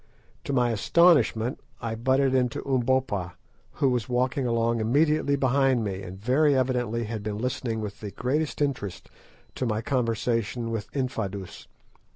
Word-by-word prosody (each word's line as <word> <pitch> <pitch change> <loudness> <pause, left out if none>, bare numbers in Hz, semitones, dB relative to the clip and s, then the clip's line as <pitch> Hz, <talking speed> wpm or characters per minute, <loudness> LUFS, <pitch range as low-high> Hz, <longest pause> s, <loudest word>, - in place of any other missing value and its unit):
To - - -2
my 125 -3 +2
astonishment 125 - +3 0.2
I 115 -1 -3
butted 130 +3 +2
into 125 -2 0
Umbopa, 125 -8 0 0.4
who 135 - +2
was 125 -1 -1
walking 125 +1 0
along 115 0 +1
immediately 145 +5 +2
behind 135 -2 +2
me, 95 -2 -3
and 95 0 -8
very 135 +6 +3
evidently 120 -3 0
had 110 -1 -4
been 105 0 -4
listening 115 -1 -2
with 105 -1 -6
the 105 - -6
greatest 145 +8 -1
interest 120 -10 -4 0.4
to 130 - -2
my 110 -1 -1
conversation 115 -2 -1
with 110 -2 -4
Infadoos. 105 -8 -4
120 Hz, 145 wpm, -26 LUFS, 110-130 Hz, 0.4 s, astonishment